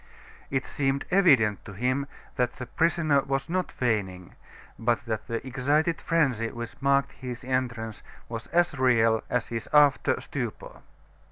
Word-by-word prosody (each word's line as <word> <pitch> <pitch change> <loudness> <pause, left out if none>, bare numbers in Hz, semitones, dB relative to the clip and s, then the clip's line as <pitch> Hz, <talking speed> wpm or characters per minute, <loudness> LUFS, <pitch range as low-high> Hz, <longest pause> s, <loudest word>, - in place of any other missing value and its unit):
It 135 -1 -1
seemed 135 -1 -1
evident 135 - +4
to 100 - -9
him 130 +7 -1 0.3
that 125 -2 0
the 125 - -6
prisoner 160 0 +2
was 135 0 -2
not 185 +2 -1
feigning, 95 -7 -2 0.5
but 120 0 0
that 110 -2 -3
the 115 +1 -3
excited 145 +6 +1
frenzy 135 -9 +1
which 120 0 -7
marked 140 0 +2
his 125 -2 -7
entrance 120 -4 -2 0.3
was 115 -1 -6
as 175 -1 +2
real 115 -3 +3
as 125 -1 -1
his 115 -1 -4
after 145 -2 +4
stupor. - - -6
130 Hz, 145 wpm, -27 LUFS, 115-140 Hz, 0.5 s, evident